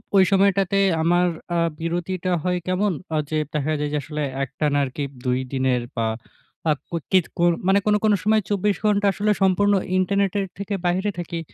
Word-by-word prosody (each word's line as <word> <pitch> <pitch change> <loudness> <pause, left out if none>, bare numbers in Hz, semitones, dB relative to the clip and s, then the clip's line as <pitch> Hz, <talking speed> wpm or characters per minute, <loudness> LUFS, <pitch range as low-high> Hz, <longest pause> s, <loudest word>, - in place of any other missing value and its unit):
ওই 195 - +7
সময়টাতে 195 0 +3 0.2
আমার 175 +2 +3 0.3
আ - - +2 0.2
বিরতিটা 175 +2 -2
হয় 180 0 0
কেমন? 190 +3 +1 0.2
আ - - +2
যে 155 - -1 0.2
দেখা 150 0 -1
যায় 150 0 -1
যে, - - +1
আসলে 150 +1 -5 0.2
একটানা 145 +2 -1
আরকি 135 +2 -4 0.2
২ 125 0 +1
দিনের 130 -2 +1
বা 115 -1 0 0.6
আ - - +5 0.2
কুত 170 -3 -4
কিত 185 -3 +4
কুর 175 0 +4 0.2
মানে 195 +1 +5
কোন, 210 0 +3
কোন 215 - +4
সময় 215 +1 +3
২৪ 205 0 +1
ঘন্টা 205 -1 +2
আসলে 210 +2 +1
সম্পূর্ণ 195 +2 +3 0.2
ইন্টারনেটের 200 +1 +1
থেকে 200 +1 -4
বাহিরে 185 +4 +1
থাকি। 170 -1 -4
185 Hz, 175 wpm, -23 LUFS, 155-200 Hz, 0.6 s, ওই